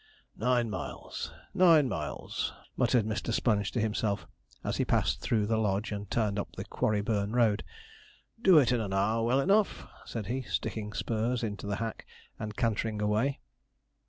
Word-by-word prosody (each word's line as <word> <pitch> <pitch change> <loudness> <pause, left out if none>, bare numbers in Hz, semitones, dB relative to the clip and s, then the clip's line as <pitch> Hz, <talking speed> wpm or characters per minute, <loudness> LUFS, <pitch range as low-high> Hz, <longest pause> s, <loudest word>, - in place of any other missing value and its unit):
'Nine 120 0 +2
miles 105 - -5 0.2
nine 165 -6 +6
miles,' - - -3 0.2
muttered 120 -4 +3
Mr. 110 +2 -2
Sponge 105 -3 +1
to 120 - 0
himself, 105 -2 0 0.4
as - - -1
he - - +2
passed - - +1
through 110 -3 +1
the 110 +1 +1
Lodge 105 +1 0
and 100 -1 -5
turned 105 -3 0
up - - -4
the - - -5
Quarryburn 105 0 0
road; 110 -4 +3 0.8
'do 190 -6 +7
it 135 -4 +5
in 120 -2 +2
an 100 -3 -3
hour 105 +4 +2
well 125 +4 +3
enough,' 195 +8 +2 0.2
said 115 -3 -5
he, 125 +6 -2
sticking 110 -3 -3
spurs 115 +2 -1
into 105 -2 -4
the 100 - -1
hack, 115 +1 -5 0.3
and 105 -1 -5
cantering 110 -1 0
away. 105 +7 +1
110 Hz, 160 wpm, -30 LUFS, 105-120 Hz, 0.8 s, do